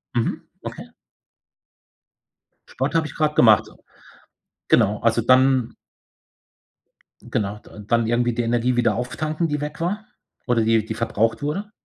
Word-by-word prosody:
Mhm, 115 - -1 0.2
okay. - - -7 1.8
Sport 135 +5 -3
habe 160 -1 +2
ich 150 - -12
gerade 155 -1 +1
gemacht. 110 -7 +5 1.0
Genau, 105 -3 +3
also, 115 0 +2
dann 130 0 +3 1.5
Genau, 105 -1 -3
da 105 - -14
dann 115 +3 0
irgendwie 120 +1 +1
die 120 - -1
Energie 120 +2 +1
wieder 120 -3 +2
auftanken, 155 +7 -2
die 150 -1 -2
weg 150 +2 -6
war 205 +5 -2 0.4
oder 120 -2 +2
die 110 0 +2
die 110 - -4
verbraucht 115 0 -1
wurde. 195 +9 -3
120 Hz, 130 wpm, -22 LUFS, 115-150 Hz, 1.8 s, gemacht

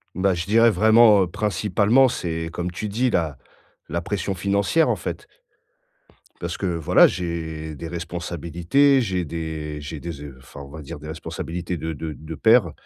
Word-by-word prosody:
Bah 95 +1 +2
je 85 -1 -3
dirais 115 +2 +5
vraiment, 110 +1 +6
heu, - - -2
principalement, 105 +6 +2
c'est 80 -6 -3
comme 90 +1 -4
tu 105 +4 -5
dis 125 +5 +1
la 80 - -1 0.5
la 85 +2 -2
pression 100 +1 -2
financière, 100 - +1
en - - +2
fait - - -6 1.1
parce - - -4
que, 95 - -2
voilà, 85 -3 +5
j'ai 80 -3 -4
des 85 +4 -7
responsabilités, 85 - +1
j'ai 95 -5 -1
des 75 -2 -5
j'ai 75 +1 -7
des 85 +2 -5
ze 70 -3 -9
enfin, 65 +2 -13
on 70 - -10
va 80 +2 -9
dire 80 +1 -8
des 75 - -10
responsabilités 85 +2 -5
de 80 0 -4
de 80 +1 -5
de 80 +1 -8
père. 110 -2 +4
85 Hz, 175 wpm, -23 LUFS, 80-100 Hz, 1.1 s, vraiment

